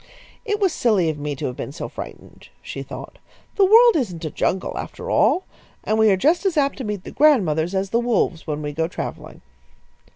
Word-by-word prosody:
"It 420 -2 -1
was 385 -5 +2
silly 200 -9 +2
of 150 - -9
me 145 0 -3
to - - -5
have 125 - -3
been 135 - -6
so 150 - -6
frightened," - - -10
she - - -6
thought. - - -9 0.4
"The 395 - +5
world 460 +4 +7
isn't 180 - -3
a 155 - -4
jungle, 190 - -1
after - - -6
all, 370 - +3 0.4
and 215 +1 0
we 220 -1 +5
are 195 - +3
just 315 - +2
as 375 -5 0
apt 280 -1 +1
to - - -3
meet 210 -4 -4
the - - -9
grandmothers 190 - +3
as 190 0 -1
the 235 - +2
wolves 225 -9 0
when 150 -1 -3
we 145 - -3
go 160 +2 -1
travelling." - - -7
205 Hz, 215 wpm, -22 LUFS, -, 0.4 s, world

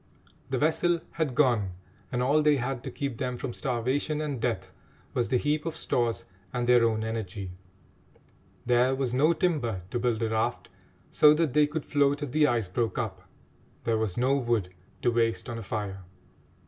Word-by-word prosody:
The 130 - 0
vessel 165 +3 +2
had 155 -7 -2
gone, 120 -10 +2 0.4
and 125 -1 0
all 145 +4 +3
they 150 -1 +4
had 125 0 -3
to - - -3
keep 135 -2 -4
them 125 -1 -2
from 120 -1 -4
starvation 130 +6 -1
and 145 -6 -3
death 95 -6 -2 0.4
was 120 -2 0
the 130 - +3
heap 150 +4 0
of 165 -1 -4
stores 115 -6 0 0.3
and 120 -1 -1
their 120 -1 +5
own 110 -1 +1
energy. 105 -4 -4 1.1
There 125 +2 +3
was 130 -2 -1
no 150 +6 +4
timber 130 - 0
to 120 - -1
build 120 -2 0
a 110 - +1
raft, 110 0 -1 0.4
so 150 0 +6
that 155 -4 +1
they 150 -1 +5
could 150 0 -4
float 145 0 +2
if 140 - -4
the 150 +2 +4
ice 115 -7 +1
broke 110 +5 -1
up; 95 -6 -4 0.5
there 115 -1 +1
was 110 -5 -2
no 130 +3 +3
wood 115 -8 0 0.3
to 120 - +3
waste 115 0 +1
on 115 -2 -4
a - - -6
fire. 100 -1 -4
125 Hz, 185 wpm, -28 LUFS, 115-145 Hz, 1.1 s, so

